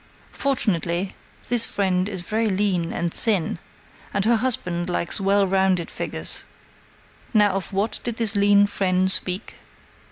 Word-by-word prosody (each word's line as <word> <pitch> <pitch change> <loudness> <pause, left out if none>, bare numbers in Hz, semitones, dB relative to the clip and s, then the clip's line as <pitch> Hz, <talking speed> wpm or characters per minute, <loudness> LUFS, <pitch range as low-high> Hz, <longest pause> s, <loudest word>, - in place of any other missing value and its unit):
Fortunately, 185 - -1 0.3
this 235 0 +2
friend 190 -1 0
is 190 -4 -4
very 220 +3 0
lean 190 -4 0
and 170 -1 -2
thin, 205 -7 0 0.5
and 200 - 0
her 230 +1 +4
husband 180 -8 -1
likes 175 +3 -1
well 200 +1 +3
rounded 190 -2 +1
figures. - - -4 0.9
Now 210 -1 +5
of 190 -1 -3
what 200 +3 -1
did 235 -2 -4
this 220 -3 -1
lean 200 0 +5
friend 190 -2 +1
speak? 185 +3 -1
195 Hz, 135 wpm, -23 LUFS, 180-210 Hz, 0.9 s, Now